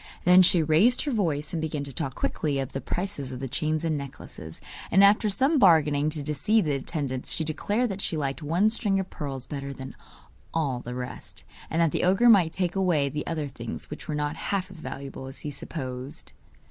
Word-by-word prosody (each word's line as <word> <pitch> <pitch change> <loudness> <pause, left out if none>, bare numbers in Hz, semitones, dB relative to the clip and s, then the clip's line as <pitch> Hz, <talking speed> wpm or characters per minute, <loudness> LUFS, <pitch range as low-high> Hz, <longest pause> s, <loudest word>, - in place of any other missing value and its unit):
Then 180 +1 +7
she 175 -2 +5
raised 170 +11 +4
her 290 - -1
voice, 165 - -1
and 165 - -1
began 150 -2 -2
to 140 -1 -6
talk 130 +1 -3
quickly 145 -3 -1
of 135 0 -2
the 135 - -4
prices 150 -8 -3
of 125 - -6
the 135 - -3
chains 155 +5 -1
and 160 -1 +1
necklaces, 140 -1 -9 0.3
and 195 +3 +6
after 210 +2 +5
some 270 +9 +2
bargaining, 155 - +5
to 155 -2 -4
deceive 175 +9 +2
the 150 - +1
attendants, 135 -2 -1
she 160 - 0
declared 205 +10 0
that 195 0 -4
she 165 - -1
liked 140 0 -2
one 175 +8 +2
string 205 -4 +1
of 190 -1 -4
pearls 135 -3 -5
better 140 -1 -5
than 130 -1 -8 0.6
all 140 -6 0
the 125 0 -6
rest, 125 0 -6 0.3
and 160 - -1
that 165 - +2
the - - 0
ogre 195 +7 +5
might 185 -7 +6
take 180 0 -1
away 170 -7 +2
the 150 +1 -4
other 155 -3 -2
things, 120 -1 -6
which 150 - -7
were 150 - -2
not 150 +1 -1
half 190 +2 -2
as 175 -4 -10
valuable 135 -2 -7
as 135 - -8
he 150 - -4
supposed. 130 -2 -6
155 Hz, 210 wpm, -27 LUFS, 140-185 Hz, 0.6 s, Then